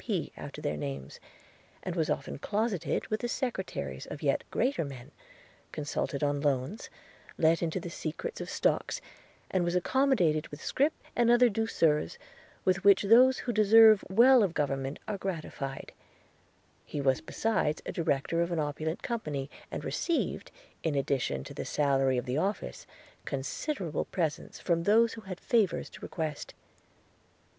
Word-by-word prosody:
P. - - -2
after - - -8
their 75 - -1
names; 70 -2 -6 0.6
and 180 - -4
was 160 -3 0
often 140 - -3
closeted 205 -3 -1
with 215 - 0
the 240 - -2
secretaries 190 - -3
of 150 - -8
yet 140 -2 +1
greater 255 -6 0
men, 135 -4 -9 0.6
consulted 145 -1 -3
on 145 0 +1
loans, 140 - -1 0.5
let 165 +1 +3
into 170 +2 -1
the 175 -1 -7
secret 170 - -5
of - - -5
stocks, - - 0 0.5
and 185 -2 +2
was 175 +1 0
accommodated 180 - +2
with 145 - -10
scrip 290 +4 +2 0.2
and 240 -1 +3
other 240 +1 +6
douceurs 165 - +1 0.5
with 190 0 +2
which 200 0 +6
those 250 +5 +6
who 240 - -1
deserve 215 0 +7
well 240 +6 +7
of 190 -5 +1
government 135 -1 -1
are 205 -2 -3
gratified; 155 -7 -5 0.9
he 150 - -5
was 135 -2 +2
besides 160 -3 -1
a - - -3
director 165 0 0
of 170 +1 0
an 170 - -1
opulent 155 +2 -2
company, 150 - -3 0.2
and - - -5
received, 340 - -1 0.3
in 160 -3 -1
addition 135 - 0
to - - -9
the - - -4
salary 135 -3 +2
of 125 - -2
the 130 +3 -1
office, 190 - -3 0.4
considerable 160 - -3
presents 160 -5 -3
from 170 -1 +1
those 225 +5 +4
who 225 - -8
had 190 -3 -7
favours 220 -6 +1
to - - -12
request. 155 -3 -5
170 Hz, 150 wpm, -30 LUFS, 145-220 Hz, 0.9 s, deserve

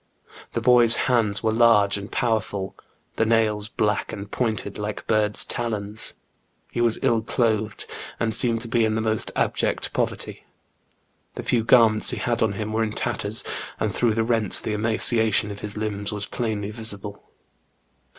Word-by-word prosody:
The - - -2
boy's 120 -2 +6
hands 115 -5 +1
were 110 - +2
large 110 -3 +4
and 100 +1 -6
powerful, 110 -5 -2 0.4
the - - +3
nails 110 -2 +1
black 105 -1 -1
and 100 +1 -8
pointed 110 -4 -2
like 105 0 -5
bird's 105 -1 +2
talons. 110 -2 -2 0.6
He 120 - -2
was 115 -2 +2
ill 115 -1 +2
clothed, 110 -2 -1 0.3
and 110 -1 0
seemed 115 0 0
to 115 - -3
be 115 0 +1
in 110 -1 +1
the 110 - -1
most 110 -1 0
abject - - -1
poverty. - - -3 0.9
The - - -6
few 115 -2 +1
garments 115 -2 +5
he - - -1
had 120 -1 -1
on 110 -3 +2
him 110 +1 -4
were 110 - 0
in 110 -1 -1
tatters, - - 0 0.4
and - - -1
through 115 -3 +1
the 115 - +1
rents 115 -3 +3
the 110 - -3
emaciation 110 0 +3
of 100 - -8
his 105 0 -3
limbs 105 -1 -3
was 105 -1 -3
plainly 105 -4 -3
visible. 105 -2 -4
110 Hz, 165 wpm, -23 LUFS, 105-115 Hz, 0.9 s, boy's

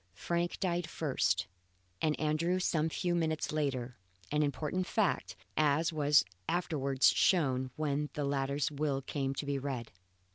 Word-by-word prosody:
Frank 170 +9 -1
died 175 -2 -1
first 95 - 0 0.6
and 155 -1 +1
Andrew 155 +4 +1
some 160 -3 +1
few 175 +2 -1
minutes 160 -2 0
later 130 -5 -2 0.3
an 150 - +2
important 155 +5 -1
fact, 210 -5 0 0.2
as 155 +2 +2
was 150 - +4 0.2
afterwards 140 -6 +2
shown 130 -8 +2
when 150 -1 -1
the 145 - -2
latter's 140 +1 0
will 140 -2 -1
came 135 -1 -2
to 145 - -3
be 140 -1 -1
read. 130 -4 -4
150 Hz, 140 wpm, -32 LUFS, 135-160 Hz, 0.6 s, was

